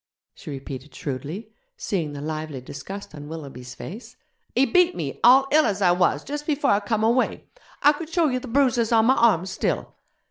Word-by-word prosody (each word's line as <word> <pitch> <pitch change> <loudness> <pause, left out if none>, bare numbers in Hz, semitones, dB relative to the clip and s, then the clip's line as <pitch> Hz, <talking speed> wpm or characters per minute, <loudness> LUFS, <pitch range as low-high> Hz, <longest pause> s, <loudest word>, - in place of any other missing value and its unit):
she - - -11
repeated 135 0 -8
shrewdly, 155 - -6 0.2
seeing 165 -7 -2
the 140 - -6
lively 155 -2 -4
disgust 190 +11 -8
on 145 -1 -9
Willoughby's 135 -6 -8
face, 215 +8 -9 0.4
'he 260 +3 +5
beat 360 +7 +3
me, 140 -4 -4
all 265 +3 +7
ill 310 +1 +5
as 205 -1 -1
I 185 -3 +4
was, 180 0 +2
jus' 290 +1 -4
before 295 -1 +1
I 200 - +4
come 215 +1 -1
away. 235 +3 +1 0.4
I 290 - +7
could 315 +1 -7
show 335 -1 +2
you 255 -2 0
the 255 - -9
bruises 245 -3 +2
on 225 -1 +5
my 260 +3 +5
arms 190 -7 +3
still. 190 - -2
210 Hz, 190 wpm, -24 LUFS, -, 0.4 s, all